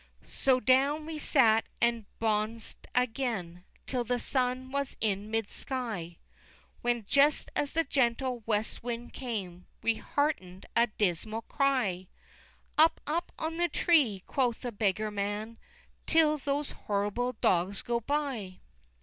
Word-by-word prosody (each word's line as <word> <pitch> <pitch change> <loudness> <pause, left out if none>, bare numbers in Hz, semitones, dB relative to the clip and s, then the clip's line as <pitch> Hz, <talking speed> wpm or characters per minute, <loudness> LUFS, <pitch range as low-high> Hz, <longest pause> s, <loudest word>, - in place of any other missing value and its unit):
XIII. - - -21
So 260 -1 +3
down 275 +4 +3
we 315 -1 -5
sat 225 -7 +4
and 235 -2 +2
bons'd 220 +1 -1
again 225 -8 -1 0.2
Till 250 -2 -1
the 245 +1 0
sun 255 +1 0
was 280 0 -2
in 205 -1 -1
mid 225 -1 -1
sky, 215 -11 -4 0.6
When, 240 -2 0
just 285 +1 +4
as 285 - 0
the 330 - +2
gentle 255 -2 0
west 215 -1 0
wind 240 0 -5
came, 195 -9 -5 0.2
We 230 -1 +2
hearken'd 190 -12 -2
a 235 +1 +5
dismal 215 +2 -1
cry: 245 -12 0 0.7
"Up, 320 +1 +6
up, 330 +4 -2
on 320 +1 -3
the 345 0 +2
tree," 275 - +3
quoth 245 -4 0
the 245 - -3
beggar 210 0 0
man, 210 +3 -3 0.5
"Till 310 -2 +4
those 280 +1 -1
horrible 210 +5 -1
dogs 190 -2 +1
go 235 0 0
by!" 245 -8 -2
235 Hz, 135 wpm, -30 LUFS, 210-275 Hz, 0.7 s, Up